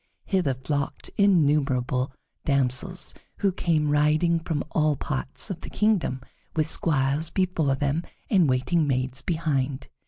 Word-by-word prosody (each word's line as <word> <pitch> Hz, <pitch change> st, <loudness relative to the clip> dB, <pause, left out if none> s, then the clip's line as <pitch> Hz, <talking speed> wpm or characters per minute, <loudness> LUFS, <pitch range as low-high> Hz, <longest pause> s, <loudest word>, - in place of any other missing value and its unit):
Hither 180 Hz, -10 st, +1 dB
flocked 140 Hz, +2 st, -3 dB
innumerable 140 Hz, -9 st, +2 dB, 0.3 s
damsels, 140 Hz, +6 st, +2 dB, 0.2 s
who 200 Hz, -2 st, +2 dB
came 155 Hz, -4 st, +1 dB
riding 155 Hz, +3 st, +3 dB
from 160 Hz, -3 st, -2 dB
all 155 Hz, -2 st, +2 dB
parts 135 Hz, +7 st, -4 dB
of 175 Hz, -2 st, -6 dB
the -, -, -8 dB
kingdom, 200 Hz, -12 st, +1 dB, 0.3 s
with 155 Hz, -1 st, +2 dB
squires 150 Hz, -1 st, 0 dB
before 170 Hz, -7 st, +1 dB
them 145 Hz, +3 st, 0 dB, 0.3 s
and 180 Hz, -8 st, +3 dB
waiting 145 Hz, +5 st, +1 dB
maids 130 Hz, -1 st, 0 dB
behind. 145 Hz, -5 st, -1 dB
150 Hz, 125 wpm, -25 LUFS, 135-170 Hz, 0.3 s, riding